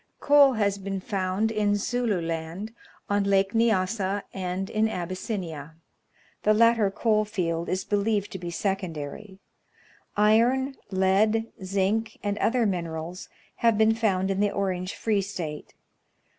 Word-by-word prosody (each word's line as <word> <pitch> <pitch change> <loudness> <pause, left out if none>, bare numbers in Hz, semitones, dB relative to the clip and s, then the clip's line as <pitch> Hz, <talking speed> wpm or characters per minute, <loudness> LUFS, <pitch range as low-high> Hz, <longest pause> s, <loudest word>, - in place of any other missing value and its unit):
Coal 285 -2 +6
has 200 -3 0
been 195 0 -4
found 195 +2 -1
in 210 -2 +1
Zulu 225 -1 0
Land, 165 +6 -4 0.3
on 205 0 +1
Lake 195 0 +2
Nyassa, 205 -3 +1
and 185 0 -3
in 220 +2 +1
Abyssinia. 175 - -5 0.7
The 215 0 +3
latter 230 -2 +4
coal 215 +1 +1
field 170 -5 -2
is 185 +1 -1
believed 205 0 0
to 190 - -6
be 175 0 -5
secondary. 190 0 -4 0.8
Iron, 235 +6 +3 0.2
lead, 205 +4 +2
zinc, 200 +4 0
and 205 0 -1
other 240 0 +2
minerals, 170 -2 -4 0.3
have 230 -2 +3
been 220 +1 +4
found 195 -4 +1
in 195 - -1
the 205 0 +3
Orange 185 -2 -2
Free 215 -3 +1
State. 170 -6 -6
200 Hz, 130 wpm, -26 LUFS, 185-220 Hz, 0.8 s, Coal